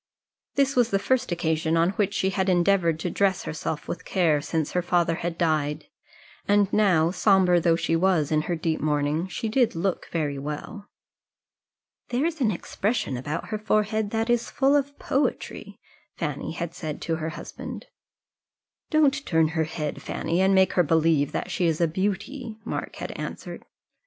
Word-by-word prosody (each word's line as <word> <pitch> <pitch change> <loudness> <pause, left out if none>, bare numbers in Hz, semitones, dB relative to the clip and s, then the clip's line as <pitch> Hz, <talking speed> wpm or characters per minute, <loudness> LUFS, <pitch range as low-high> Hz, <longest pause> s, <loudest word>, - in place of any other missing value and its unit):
This 275 0 +2
was 245 -2 +3
the 195 - +2
first 255 +3 0
occasion 160 -1 0
on 170 +2 +3
which 200 0 -1
she 190 -1 +1
had 190 0 0
endeavoured 175 -2 +3
to 175 - -1
dress 195 -1 +1
herself 155 -1 -4
with - - -5
care 165 -6 +2
since 155 0 -2
her 180 - +1
father 175 -1 +1
had 170 0 -3
died; 155 -3 0 0.6
and 205 -1 +3
now, 180 -6 +4
sombre 185 -2 +4
though 170 -1 +3
she 165 0 0
was 165 -4 +2
in 155 -1 +3
her 175 - +1
deep 160 -1 -1
mourning, 150 +3 0
she 190 +5 -4
did 235 -1 +2
look 180 +2 -1
very 145 -4 -1
well. 150 +9 -6 1.2
"There 250 +5 0
is 330 -3 -2
an 235 - +3
expression 210 - -2
about 145 +6 -4
her 215 - -2
forehead 215 0 +1
that 225 +1 -1
is 240 -1 +1
full 275 +1 +3
of 285 0 0
poetry," 245 -6 -2 0.4
Fanny 150 -2 -3
had 170 0 -4
said 155 -3 -5
to 165 -1 -1
her 160 0 -3
husband. - - -8 1.0
"Don't 300 -3 +3
you - - -20
turn 160 - +2
her 160 0 0
head, 150 -1 -4
Fanny, 170 +3 -1
and 195 0 +4
make 190 -1 +4
her 180 - +4
believe 160 -2 +2
that - - -3
she 175 - +1
is 160 -2 0
a 170 - +3
beauty," 205 - -3
Mark - - -4
had - - -5
answered. - - -7
180 Hz, 175 wpm, -25 LUFS, 160-210 Hz, 1.2 s, now